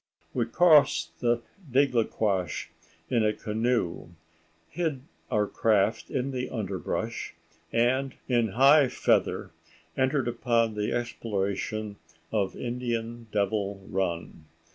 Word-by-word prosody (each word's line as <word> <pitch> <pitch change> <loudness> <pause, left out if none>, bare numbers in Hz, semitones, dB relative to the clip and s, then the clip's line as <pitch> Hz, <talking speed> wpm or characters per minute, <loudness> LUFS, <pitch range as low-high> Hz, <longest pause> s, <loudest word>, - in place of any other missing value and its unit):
We 120 -2 0
crossed 145 - +4
the 120 0 +1 0.3
Digdequash 110 - +1 0.4
in 120 -3 +3
a 105 0 +2
canoe, 110 -6 -1 0.6
hid 155 - -2 0.3
our 105 -1 +2
craft 110 +1 +1
in 135 0 -1
the 125 -1 -3
underbrush, 100 -6 -3 0.4
and 130 +3 +1
in 120 -3 +2
high 140 +3 +6
feather 125 - +1 0.4
entered 130 0 +1
upon 115 -1 +1
the 105 0 -2
exploration 110 -2 -2 0.3
of 100 -3 0
Indian 120 -1 -3
Devil 100 -1 -1
Run. 85 -4 -3
115 Hz, 100 wpm, -28 LUFS, 105-125 Hz, 0.6 s, high